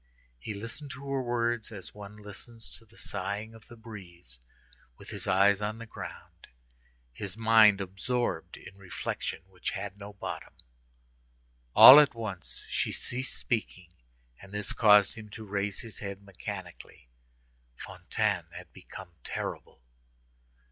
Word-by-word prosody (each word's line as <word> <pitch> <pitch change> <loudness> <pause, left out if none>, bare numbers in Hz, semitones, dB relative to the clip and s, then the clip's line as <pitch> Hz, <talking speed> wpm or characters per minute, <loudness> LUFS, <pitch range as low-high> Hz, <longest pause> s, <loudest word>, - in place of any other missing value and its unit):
He 105 - -5
listened 120 +8 -6
to 135 +2 -9
her 135 -1 +1
words 120 -2 0
as 100 -4 -7
one 105 0 -10
listens 110 +2 -8
to 115 - -21
the 110 +1 -20
sighing 100 +3 -4
of 115 -1 -15
the 120 - -12
breeze, 90 - -11 0.6
with - - -12
his - - -4
eyes 100 +1 +4
on 105 +1 -2
the 115 - -8
ground, - - -10 0.7
his 100 - -5
mind 110 -3 +6
absorbed 95 -1 -2
in 95 - -12
reflection 90 -3 -4
which 95 -1 -4
had 100 0 -6
no 100 0 -9
bottom. 100 - -6 1.2
All 140 +3 +13
at 145 -4 +4
once 95 - -6
she - - 0
ceased 130 +2 -3
speaking, 90 -6 -3 0.5
and 95 - -13
this 105 +2 -2
caused 105 -3 +6
him 110 -2 -10
to 110 - -8
raise 100 0 -2
his 115 -2 -6
head 100 -1 -6
mechanically. 95 - -9 0.7
Fantine - - -2
had - - -11
become 95 -2 -11
terrible. - - -5
105 Hz, 140 wpm, -30 LUFS, 95-115 Hz, 1.2 s, All